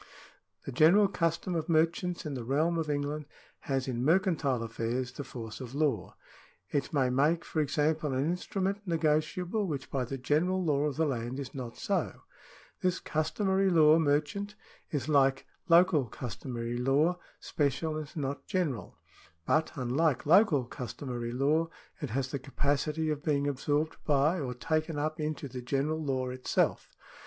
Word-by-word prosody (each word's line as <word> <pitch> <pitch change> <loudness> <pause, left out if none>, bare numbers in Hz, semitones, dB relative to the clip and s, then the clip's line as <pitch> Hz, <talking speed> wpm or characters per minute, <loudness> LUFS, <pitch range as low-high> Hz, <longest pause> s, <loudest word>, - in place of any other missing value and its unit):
The - - -4
general 170 +10 +6
custom 170 -1 -1
of 165 0 -2
merchants 165 +2 +1
in 150 - -3
the 125 -3 -4
realm 155 +7 +1
of 155 -2 -2
England 145 +1 -2 0.4
has 135 -1 0
in 125 -2 -2
mercantile 160 - +2
affairs 115 +2 -2
the 145 - -6
force 115 -2 -8
of 130 +1 -7
law. 140 - 0 0.6
It 140 -2 -1
may 135 -5 +2
make, 150 +6 +2
for 160 - -2
example, 150 +1 0
an 130 +2 0
instrument 190 +4 -1
negotiable, 170 +5 0
which 140 -5 -4
by 130 -2 0
the 135 +3 -5
general 165 +8 +1
law 145 -2 +2
of 145 -3 -1
the 160 - +2
land 125 -1 -2
is 135 -2 -6
not 125 -4 -6
so. - - -2 0.6
This 185 0 +1
customary 190 +5 +1
law 160 -2 +6
merchant 160 +8 0 0.3
is, 140 -3 -2
like 135 -3 +3 0.2
local 170 -4 +5
customary 120 +1 -5
law, 145 +8 +2 0.2
special 145 +2 -1
and 155 -2 -6
not 140 -1 -3
general; 145 - -2 0.5
but, 155 0 +2
unlike 135 +2 +1
local 160 - +5
customary 120 0 -5
law, 150 +6 +1 0.3
it 145 - -3
has 130 +3 -2
the 140 - -2
capacity 145 +3 -1
of 150 -1 -3
being 145 -2 +1
absorbed 145 +3 0
by, 150 +4 +2
or 125 -4 -3
taken 155 +4 -1
up 155 +2 -2
into 150 -1 -3
the 125 -1 -7
general 145 +5 -1
law 130 -3 -1
itself. 125 0 0
145 Hz, 155 wpm, -30 LUFS, 130-160 Hz, 0.6 s, general